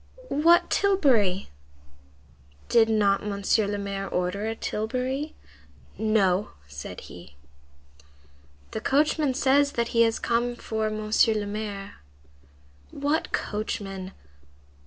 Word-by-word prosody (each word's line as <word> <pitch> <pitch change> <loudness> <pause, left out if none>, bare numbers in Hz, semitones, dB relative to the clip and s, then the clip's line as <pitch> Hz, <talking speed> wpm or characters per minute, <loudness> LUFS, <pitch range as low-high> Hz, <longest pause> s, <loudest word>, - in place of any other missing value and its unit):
"What 330 +4 +4
tilbury?" 260 - +2 1.2
"Did 225 -1 +5
not 205 -3 +2
Monsieur 200 +1 +1
le 205 0 -2
Maire 200 -1 -4
order 180 +4 -1
a 225 - -2
tilbury?" 255 +8 -3 0.6
"No," 210 -3 +1
said 70 0 -8
he. 70 - -12 1.4
"The 220 - -4
coachman 295 0 +2
says 280 +1 +3
that 235 0 -1
he 230 - +2
has 225 -1 +3
come 240 +1 0
for 220 -2 -2
Monsieur 215 +1 +2
le 210 -1 -1
Maire." 205 -1 -5 0.9
"What 290 +3 -1
coachman?" 195 -3 -4
220 Hz, 105 wpm, -26 LUFS, 200-255 Hz, 1.4 s, Did